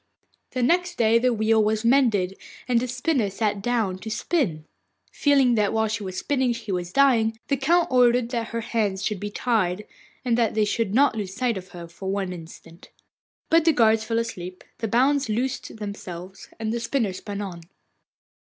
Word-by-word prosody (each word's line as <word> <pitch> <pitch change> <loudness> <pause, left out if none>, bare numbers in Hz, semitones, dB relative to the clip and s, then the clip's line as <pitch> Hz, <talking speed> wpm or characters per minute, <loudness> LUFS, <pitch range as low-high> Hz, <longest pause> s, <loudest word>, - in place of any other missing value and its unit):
The 255 - -1
next 355 +6 +1
day 230 0 +4
the 250 +1 +2
wheel 220 -1 +2
was 215 +1 0
mended, 225 -8 +3 0.3
and 245 -2 +3
the 250 - -2
spinner 245 -3 0
sat 205 0 -1
down 215 -5 -1
to 220 - -7
spin. 215 - -1 0.5
Feeling 275 -4 +3
that 210 -2 +1
while 220 0 +1
she 220 +1 -3
was 185 -2 -6
spinning 260 -2 0
he 225 -3 -6
was 180 -1 -3
dying, 230 -5 +3
the 280 - +2
Count 335 +6 +2
ordered 245 -1 +4
that 235 -2 -2
her 230 0 -4
hands 205 -4 -1
should 210 -3 -2
be 205 +1 -4
tied, 210 -4 0 0.4
and 240 -2 +2
that 230 -2 +1
they 215 -1 +3
should 210 -1 -1
not 280 -3 +4
lose 200 -3 -4
sight 240 0 0
of 185 -1 -7
her 175 -1 -9
for 190 +3 -7
one 195 -2 -2
instant. 165 0 -12 0.6
But 330 0 +5
the 325 0 +4
guards 220 -3 +3
fell 225 +1 -2
asleep, 185 -6 -5 0.2
the 225 - -2
bonds 270 +4 +2
loosed 245 +4 -2
themselves, 195 -3 -8
and 220 0 -2
the 235 - -1
spinner 230 -4 -1
spun 200 +2 -6
on. 185 -4 -6
225 Hz, 190 wpm, -24 LUFS, 200-245 Hz, 0.6 s, But